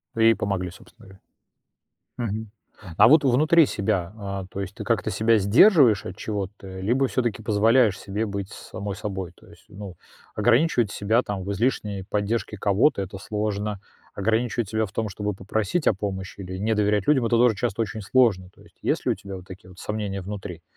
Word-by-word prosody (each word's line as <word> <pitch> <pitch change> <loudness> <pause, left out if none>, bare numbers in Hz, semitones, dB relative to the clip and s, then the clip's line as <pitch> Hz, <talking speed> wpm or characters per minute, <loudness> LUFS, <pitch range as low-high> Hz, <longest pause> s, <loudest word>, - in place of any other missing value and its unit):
Да 115 - -1
и 115 0 +7
помогли, 100 -3 -2
собственно 95 - -17
говоря. 95 0 -17 1.6
Мгм. 90 -4 -10
А - - +8
вот 155 +4 +6
внутри 155 +5 +5
себя, 100 -6 -2
а, 100 -2 -5
то 100 - -4
есть 95 +1 -6
ты - - -6
как-то - - 0
себя 110 +3 +3
сдерживаешь 115 - +5
от 95 - -6
чего-то 100 -2 -5
либо 125 +7 +1
всё-таки 120 -5 -1
позволяешь 110 0 +3
себе 105 +2 -3
быть 100 -2 -5
самой 100 0 -7
собой? 95 -3 -5
То - - -20
есть, - - -18
ну, 100 -2 -9 0.4
ограничивать 120 0 +2
себя 110 +4 +1
там 100 -2 -4
в 100 - -4
излишней 105 -3 -1
поддержке 105 +2 -2
кого-то- 100 +4 +2
это 95 +1 -6
сложно. 105 0 -3 0.3
Ограничивать 115 +1 0
себя 110 0 0
в 95 - -12
том, 110 +1 -2
чтобы 105 +2 -3
попросить 105 - -2
о - - +5
помощи 95 -1 -5
или 95 0 -6
не 110 +3 0
доверять 105 -1 +1
людям, 135 -5 +3
это 115 0 +2
тоже 120 -2 +4
часто 115 +1 -2
очень 110 0 -4
сложно. 100 -4 +2
То - - -22
есть, - - -21
есть - - -1
ли - - +2
у - - 0
тебя 100 -1 -9
вот 90 - -12
такие 95 0 -12
вот 90 0 -15
сомнения 105 -2 -3
внутри 95 -3 -7
105 Hz, 190 wpm, -24 LUFS, 95-115 Hz, 1.6 s, А